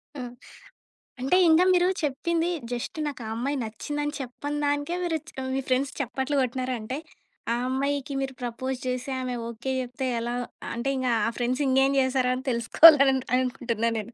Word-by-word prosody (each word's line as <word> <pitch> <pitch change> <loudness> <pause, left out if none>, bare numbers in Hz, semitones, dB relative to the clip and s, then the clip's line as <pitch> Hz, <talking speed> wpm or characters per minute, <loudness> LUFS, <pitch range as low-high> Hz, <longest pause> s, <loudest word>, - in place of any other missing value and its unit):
హ్మ్. 250 -3 -6 0.9
అంటే, 270 +8 +2
ఇంగా 325 +3 +6
మీరు 355 0 +4
చెప్పింది 330 +4 0 0.2
జస్టు 245 +6 -4
నాకు 280 -4 -5
ఆ - - -5
అమ్మాయి 275 +5 -1
నచ్చిందని 290 +7 -4
చెప్పని 280 +3 -5
దానికే 290 +4 0
మీరు 330 -2 0
చ్ - - -11 0.2
మీ 270 - 0
ఫ్రెండ్స్ 265 +2 +1
చప్పట్లు 265 +2 -2
కొట్టినారంటే, 255 -1 -2 0.6
ఆ - - +1
అమ్మాయికి 280 +2 -1
మీరు 270 0 -3
ప్రపోజ్ 250 +2 -3
చేసి 250 +1 -2
ఆమె 255 -1 -3
ఓకే 235 +3 -4
జెప్తే 255 +1 -3
ఎలా 240 +1 -3 0.4
అంటే 235 +4 -2
ఇంగ 260 -1 -1 0.2
ఆ - - +2
ఫ్రెండ్స్ 250 +3 0
ఇంగేం 270 +1 +3
చేస్తారో 260 -1 +2
అని 260 +1 -7
తెలుసుకోవాలని 270 +2 +7
అననుకుంటున్నాను 235 -3 0
నేను. 230 +3 -8
260 Hz, 155 wpm, -26 LUFS, 245-285 Hz, 0.9 s, తెలుసుకోవాలని